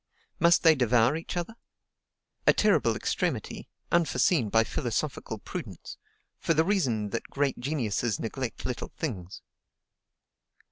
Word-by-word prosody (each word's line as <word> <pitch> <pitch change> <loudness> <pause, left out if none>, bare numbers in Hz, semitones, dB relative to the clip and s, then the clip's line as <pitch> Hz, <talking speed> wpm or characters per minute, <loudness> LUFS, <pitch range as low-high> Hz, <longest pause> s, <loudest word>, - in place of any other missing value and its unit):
Must 170 0 +5
they 165 -2 +8
devour 125 -1 +3
each 165 +2 -5
other? 175 +6 -3 0.9
A - - +8
terrible - - +3
extremity, - - -2 0.2
unforeseen 165 - +2
by 115 +2 +4
philosophical - - -3
prudence; - - -8 0.4
for 165 - +1
the 160 +1 +3
reason 125 - 0
that 115 - -4
great 140 -2 -1
geniuses 120 -5 -1
neglect 120 +1 -4
little 125 - -4
things. 95 - -5
130 Hz, 120 wpm, -28 LUFS, 115-165 Hz, 0.9 s, they